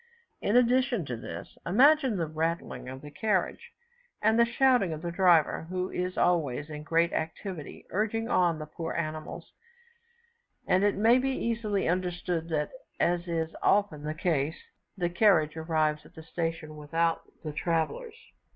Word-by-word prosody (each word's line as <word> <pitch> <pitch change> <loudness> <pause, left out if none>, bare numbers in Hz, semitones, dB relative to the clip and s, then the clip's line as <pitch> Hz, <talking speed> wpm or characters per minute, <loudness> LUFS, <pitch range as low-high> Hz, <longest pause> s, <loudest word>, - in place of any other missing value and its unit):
In 205 - +1
addition 250 - +3
to 125 - -4
this, 115 - -8
imagine 265 - +4
the 170 - 0
rattling 160 -3 -3
of 130 +1 -8
the 145 - -9
carriage, 210 - -1 0.5
and 220 +2 +3
the 235 - +5
shouting 245 -7 +3
of 155 +1 -7
the 170 - -2
driver, 170 -3 +3
who 185 0 -2
is 180 0 -3
always 150 -4 +1
in 150 0 -6
great 165 +2 +1
activity 160 0 -5
urging 220 +4 -1
on 175 -8 +2
the 155 - -6
poor 165 +2 -5
animals, 155 -1 -5 1.1
and 185 +2 +3
it 205 -1 +3
may 230 +5 +5
be 265 +1 0
easily 225 -5 -1
understood 175 -2 -1
that, 150 -2 -1 0.3
as 175 0 +1
is 165 -1 -2
often 200 -7 +2
the 155 +1 -3
case, 155 -2 0 0.4
the 175 -2 +1
carriage 175 -4 +3
arrives 155 -2 0
at - - -19
the 160 - -10
station 165 -2 -4
without 165 +2 0 0.2
the 155 -2 -4
travellers. 170 - -1
170 Hz, 155 wpm, -29 LUFS, 155-205 Hz, 1.1 s, the